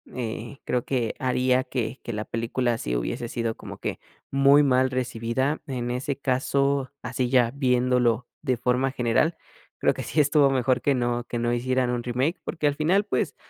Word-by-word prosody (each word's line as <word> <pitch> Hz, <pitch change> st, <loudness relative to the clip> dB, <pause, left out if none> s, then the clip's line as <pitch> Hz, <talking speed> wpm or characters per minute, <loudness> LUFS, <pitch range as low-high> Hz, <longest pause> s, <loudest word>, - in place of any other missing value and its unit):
eh, 120 Hz, +1 st, -5 dB
creo 125 Hz, -1 st, 0 dB
que 125 Hz, -4 st, -1 dB
haría 130 Hz, 0 st, +2 dB
que 130 Hz, -1 st, -3 dB
que -, -, -4 dB
la 105 Hz, -1 st, -4 dB
película 115 Hz, +1 st, -1 dB
sí -, -, -3 dB
hubiese 115 Hz, -, -3 dB
sido 115 Hz, -1 st, -2 dB
como -, -, -9 dB
que -, -, -4 dB, 0.3 s
muy 140 Hz, +2 st, +6 dB
mal 130 Hz, -1 st, +3 dB
recibida. 125 Hz, +3 st, -1 dB
En 120 Hz, -3 st, -3 dB
ese 130 Hz, +2 st, -2 dB
caso, 140 Hz, 0 st, 0 dB
así 125 Hz, -1 st, -1 dB
ya 120 Hz, -2 st, +4 dB
viéndolo 125 Hz, -3 st, +2 dB
de 130 Hz, -5 st, 0 dB
forma 125 Hz, +3 st, +1 dB
general, 130 Hz, +6 st, +1 dB, 0.4 s
creo -, -, +2 dB
que -, -, -6 dB
sí 155 Hz, -, -1 dB
estuvo 145 Hz, -1 st, +5 dB
mejor 130 Hz, -1 st, +1 dB
que 140 Hz, -, +2 dB
no 120 Hz, -1 st, 0 dB
que 120 Hz, -, -4 dB
no 120 Hz, 0 st, 0 dB
hicieran 125 Hz, +1 st, 0 dB
un 120 Hz, -1 st, -2 dB
remake, 130 Hz, +8 st, -1 dB
porque, 155 Hz, -4 st, -1 dB
al 145 Hz, -, +1 dB
final 175 Hz, +7 st, +2 dB
pues -, -, -1 dB
125 Hz, 180 wpm, -25 LUFS, 120-135 Hz, 0.4 s, muy